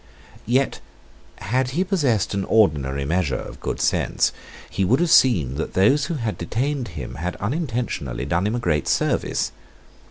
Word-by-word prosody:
Yet, 130 +3 +1 0.6
had 125 +6 0
he 185 - +3
possessed 145 - +1
an 100 0 -1
ordinary 70 -10 +2
measure 80 -3 0
of - - -8
good - - -4
sense, - - +1 0.4
he 95 - -2
would 120 +9 +3
have 175 -2 +1
seen 85 - +5
that 80 - -4
those 135 +10 +4
who 170 - -3
had 115 -6 -3
detained 135 +2 -2
him - - -6
had 90 +2 -2
unintentionally 115 - -3
done 85 +7 0
him 110 - -1
a - - -1
great 80 - 0
service. - - 0
110 Hz, 160 wpm, -22 LUFS, 85-130 Hz, 0.6 s, seen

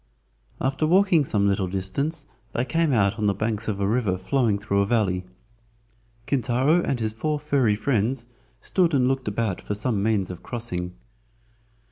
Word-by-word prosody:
After 135 +3 0
walking 180 -2 +4
some 105 -6 +1
little 95 -1 +1
distance 140 - -2 0.3
they 120 - 0
came 165 +2 +1
out 105 -3 +2
on 105 - +1
the 100 - +1
banks 110 +1 -2
of 105 -3 -2
a 100 - +1
river 105 -3 +1
flowing 115 +1 +1
through 100 -1 0
a - - +2
valley. 95 -5 +1 1.0
Kintaro 135 +6 +2
and 135 -6 -1
his 110 -1 -1
four 150 +7 -1
furry 140 -8 +2
friends 120 +1 0 0.4
stood 175 -5 +1
and 125 -2 +3
looked 130 -2 -1
about 105 -2 -1
for 105 - -3
some 110 -1 0
means 100 -3 +1
of 90 - -9
crossing. 90 -7 -4
115 Hz, 165 wpm, -24 LUFS, 100-135 Hz, 1.0 s, walking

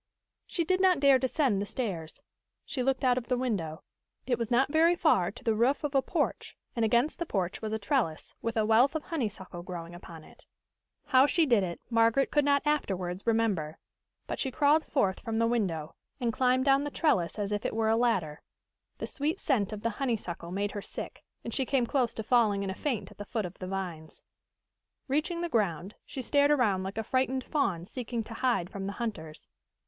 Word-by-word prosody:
She 340 - -1
did 370 +3 +1
not 370 -4 +4
dare 275 -2 +6
descend 260 -5 +1
the 205 - -3
stairs. 180 -12 -4 0.4
She 260 - -3
looked 265 +1 0
out 250 -1 +4
of 235 - -13
the 250 - +1
window. 195 -11 -2 0.4
It 245 -2 0
was 230 -2 -2
not 265 +3 +3
very 330 +3 +4
far 250 - +3
to 200 - -12
the 225 - +2
roof 245 +8 +2
of 295 -1 -2
a 270 - +4
porch, - - -2 0.2
and 230 - 0
against 240 +9 +2
the 340 - -1
porch 185 - -2
was 215 -1 -3
a 220 - 0
trellis, 210 - -1
with 230 0 -2
a 215 - +3
wealth 235 +7 +4
of 310 - -2
honeysuckle 205 - -4
growing 175 -1 -7
upon 170 -2 -11
it. - - -19 0.6
How 260 +1 +5
she 330 +2 +3
did 235 -7 +4
it, 175 -2 -3
Margaret 230 +4 +3
could 295 - +3
not 280 +1 +2
afterwards 190 -10 -1
remember. 205 -9 +1 0.5
But - - -4
she 265 - 0
crawled 295 +3 +3
forth 195 -10 0
from 225 -2 -3
the 230 - +3
window, 185 -10 -1 0.3
and 235 -2 0
climbed 255 +1 +2
down 275 0 +5
the 290 - -2
trellis 230 - +1
as 205 -1 -2
if 205 -1 -1
it - - -2
were 220 -1 +1
a 225 - +4
ladder. 195 -11 0 0.6
The - - -4
sweet 310 +6 -2
scent 225 -7 +1
of 210 -1 -6
the 230 - +1
honeysuckle 205 -10 -2
made 200 +2 -1
her 205 - -5
sick, - - -7 0.2
and 230 - -5
she 270 - 0
came 260 -1 +1
close 250 -1 +1
to 220 - -4
falling 215 -4 +3
in 195 - -2
a - - -3
faint 215 -4 -3
at - - -17
the 205 - -5
foot 220 -2 -2
of 180 +1 -9
the 185 - -5
vines. 180 -5 -6 0.8
Reaching 305 +5 0
the 345 - -1
ground, 200 - -1
she 260 - -6
stared 285 +2 +3
around 235 -10 +3
like 190 +2 -5
a 225 - -1
frightened 260 +2 0
fawn 195 - -1
seeking 235 +1 -4
to 225 - -9
hide 235 -8 0
from 195 -2 -5
the 200 - -3
hunters. 165 -11 -6
230 Hz, 215 wpm, -29 LUFS, 195-270 Hz, 0.8 s, dare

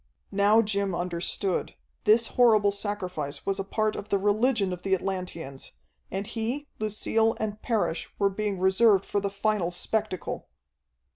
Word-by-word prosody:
Now 205 +3 +5
Jim 200 -3 0
understood. 175 +2 -1 0.3
This 225 +2 +5
horrible 215 -5 +5
sacrifice 185 -8 -4
was 195 0 -1
a - - 0
part 215 +2 0
of 205 - -7
the 200 - +3
religion 205 0 +2
of 180 - -7
the 190 0 +2
Atlanteans, 180 -7 -5 0.4
and 195 +2 -3
he, 235 +6 -3
Lucille, 220 +1 +1
and 215 -1 -3
Parrish, 220 -8 -1
were 200 -1 +2
being 205 0 -2
reserved 190 +2 +4
for 205 - 0
the 200 - -1
final 200 -2 0
spectacle. 185 +1 -3
200 Hz, 145 wpm, -27 LUFS, 190-215 Hz, 0.4 s, Now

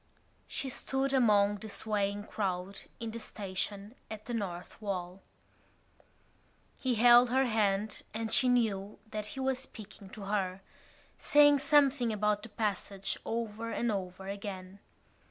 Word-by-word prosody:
She 275 - -3
stood 270 +1 -1
among 205 -5 +4
the 220 +2 -7
swaying 205 -1 -1
crowd 190 -2 -3 0.2
in 230 -1 -4
the 230 - -6
station 200 0 -4 0.2
at 215 -1 -7
the 240 - -5
North 185 -3 -5
Wall. 185 -2 -4 1.6
He 255 -3 0
held 240 +2 +7
her 265 +2 +3
hand 210 -2 +1
and 220 0 -3
she 255 - +4
knew 210 -5 +1
that 210 -1 -3
he - - -3
was 265 -1 0
speaking 210 -6 -11
to 205 - -9
her, 195 -2 -1 0.6
saying 290 -1 +6
something 275 -5 +4
about 210 -1 +1
the 220 - -9
passage 200 -2 -2
over 230 0 -3
and 235 0 0
over 190 -1 -4
again. 195 -1 -6
210 Hz, 135 wpm, -31 LUFS, 195-240 Hz, 1.6 s, held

